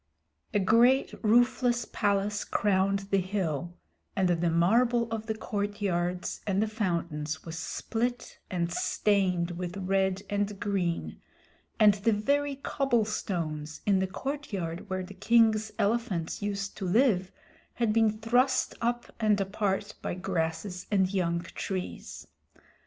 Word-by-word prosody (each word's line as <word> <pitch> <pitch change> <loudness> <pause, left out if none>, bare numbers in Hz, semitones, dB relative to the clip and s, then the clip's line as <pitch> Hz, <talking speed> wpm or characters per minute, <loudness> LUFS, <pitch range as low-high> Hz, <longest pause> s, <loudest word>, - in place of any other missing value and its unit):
A - - +1
great 235 +7 +4
roofless 240 +1 +3
palace 205 0 0
crowned 195 -1 +1
the 195 - +4
hill, 175 -3 -2 0.4
and 190 -2 +2
the 170 0 +2
marble 230 +8 +3
of 220 -1 -3
the 220 - -1
courtyards 200 -5 -2
and 195 -1 +1
the 220 - +2
fountains 170 -7 -2
was 165 -1 -5
split, 245 +1 -3
and 175 -1 -1
stained 185 -4 +1
with 175 +1 -5
red 190 0 0
and 205 0 -2
green, 185 -5 -2 0.6
and 210 -2 +7
the 215 +3 +1
very 280 +7 +1
cobblestones 210 - -1
in 200 -2 +3
the 190 - 0
courtyard 195 - -4
where 185 0 -2
the 190 +2 -9
king's 220 +1 +3
elephants 200 -7 -1
used 200 -1 -3
to 195 - -4
live 190 -3 +3 0.4
had 230 -3 +1
been 220 -1 +3
thrust 245 +4 +2
up 240 +1 -1
and 215 -2 +3
apart 200 0 -1
by - - -3
grasses 180 0 -3
and 190 -2 +2
young 170 -3 0
trees. 180 +2 -5
200 Hz, 130 wpm, -29 LUFS, 180-220 Hz, 0.6 s, and